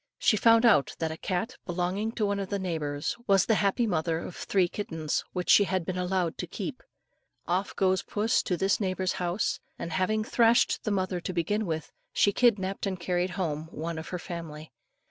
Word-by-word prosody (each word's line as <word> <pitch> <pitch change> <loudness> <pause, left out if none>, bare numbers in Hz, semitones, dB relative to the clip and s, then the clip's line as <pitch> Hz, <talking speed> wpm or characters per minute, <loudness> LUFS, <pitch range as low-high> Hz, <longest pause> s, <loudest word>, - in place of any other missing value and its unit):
She - - +3
found 230 +2 +5
out 210 -12 +4
that 160 -1 -2
a - - -4
cat, 205 +9 -3
belonging 185 +5 -1
to 220 - 0
one 200 0 0
of 195 -1 -4
the 200 - -1
neighbours, 155 -6 -2
was 195 -2 +5
the 225 - +3
happy 205 +4 +2
mother 165 -5 0
of 170 +1 -6
three 190 -3 +1
kittens 160 -5 -3
which 180 -1 -3
she 205 - +7
had 185 -3 -1
been 185 - -3
allowed 180 -2 -1
to - - -3
keep. - - -5 0.7
Off 185 +3 -1
goes 190 -1 +2
puss 215 +2 +1
to 180 - -1
this 195 +3 +2
neighbour's 185 -2 -1
house, 175 +3 0 0.2
and 170 - -5
having 215 +6 +1
thrashed 235 -1 +3
the - - +1
mother 185 -2 -1
to 185 - -4
begin 205 +5 0
with, 160 -2 -3 0.2
she 205 - +4
kidnapped 200 -5 +2
and 190 -2 -3
carried 180 +1 0
home 160 -4 -2
one 165 +1 -4
of 160 - -8
her 180 - -3
family. 160 -4 -7
185 Hz, 200 wpm, -28 LUFS, 170-205 Hz, 0.7 s, she